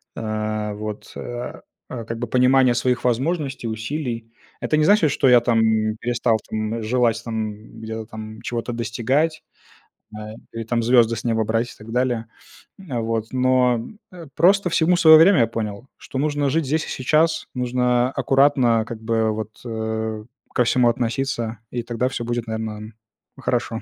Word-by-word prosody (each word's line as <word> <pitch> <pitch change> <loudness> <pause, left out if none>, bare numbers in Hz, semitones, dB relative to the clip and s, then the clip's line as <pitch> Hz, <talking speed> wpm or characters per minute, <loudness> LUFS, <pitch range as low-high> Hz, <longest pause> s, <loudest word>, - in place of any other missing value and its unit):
а, 110 -1 -3
вот, 105 0 -7
а, 120 0 -6 0.3
а, 120 -3 -5
как 115 +1 -5
бы 120 - -3
понимание 130 +1 +4
своих 125 +1 0
возможностей, 135 +1 -1
усилий. 115 0 -4 0.3
Это 155 - +1
не 155 - +3
значит, 185 -8 +4
что 140 - +2
я 125 -1 +8
там, 115 -1 +2
м, 110 -1 +1
перестал 120 -1 +1
там, 110 +1 -2
м, 115 - -4
желать 115 0 +1
там, 110 -2 -3
м, 110 +2 -14
где-то 110 0 -5
там 110 -1 -9
чего-то 120 0 -4
достигать, 125 +7 -1 0.7
а, 105 0 -7 0.2
или 115 0 -4
там 115 +1 -1
звезды 120 -1 +4
с - - -6
неба 110 -1 +1
брать 115 +2 -1
и - - -21
так 110 +1 -11
далее. 120 -2 0 0.5
М, 135 -12 -4
вот. 115 -1 -2
Но, 130 -2 +2 0.3
э, 170 -3 -11
просто 185 +4 +4
всему 170 +1 +3
свое 160 -3 +9
время, 170 +1 +6
я 115 - +3
понял, 110 +1 -5
что - - -8
нужно 145 -1 0
жить 160 +2 0
здесь 155 +4 0
и - - -8
сейчас. 155 +5 +1
Нужно 125 0 +1
аккуратно 135 -4 +3
как 115 -2 -7
бы 110 -1 +1
вот, 110 0 -7
э, 110 -1 -3 0.3
ко 125 - +3
всему 120 0 +3
относиться, 120 -1 -2
и 120 -1 -3
тогда 120 +2 -1
всё 120 - -4
будет, 120 -1 -3
наверно, 110 0 -5 0.4
хорошо. - - -2
120 Hz, 170 wpm, -22 LUFS, 110-130 Hz, 0.7 s, свое